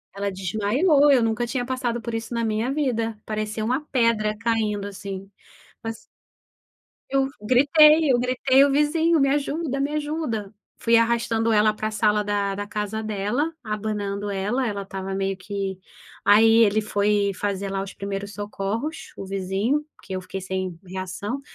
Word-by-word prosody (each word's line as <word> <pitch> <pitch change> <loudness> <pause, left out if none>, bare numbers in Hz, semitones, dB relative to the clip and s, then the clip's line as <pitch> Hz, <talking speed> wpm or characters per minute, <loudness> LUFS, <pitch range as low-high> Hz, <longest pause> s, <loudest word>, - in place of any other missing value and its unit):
Ela 200 0 -2
desmaiou, 220 - +3
eu 260 -3 +5
nunca 225 +1 0
tinha 245 +1 -2
passado 245 -2 -2
por 235 +1 -5
isso 225 +1 -4
na 235 0 -1
minha 220 +3 0
vida, 230 -7 -1
parecia 215 0 -3
uma 255 +5 0
pedra 230 -4 +2
caindo, 215 -3 -1
assim. 195 -1 -7 0.5
Mas 225 0 -5 1.1
Eu 270 0 +1
gritei, 300 +6 +5
eu 245 - +3
gritei 255 +2 +4
o 285 - +1
vizinho: 315 +3 +3
"Me 275 -1 +3
ajuda, 285 0 -1
me 280 +2 0
ajuda". 295 -9 -3 0.3
Fui 230 0 +3
arrastando 230 -1 +1
ela 215 0 +4
pra 215 0 -3
sala 210 -1 +2
da 205 -1 -1
da 205 +1 -5
casa 210 +1 -3
dela, 215 +9 -1
abanando 205 -2 -3
ela, 205 +6 -1
ela 200 -2 -3
estava 195 0 -5
meio 195 0 -1
que 195 -1 -4 0.5
aí 225 +2 +7
ele 210 +1 +2
foi 205 -1 +1
fazer 200 0 -3
lá, 195 0 -1
os 195 0 -7
primeiros 200 +1 -5
socorros, 210 +8 -4
o - - -7
vizinho, 195 +9 -1
porque - - -10
eu 185 - -3
fiquei 185 +1 -6
sem 185 -2 -3
reação. 190 +7 -5
215 Hz, 160 wpm, -24 LUFS, 200-255 Hz, 1.1 s, aí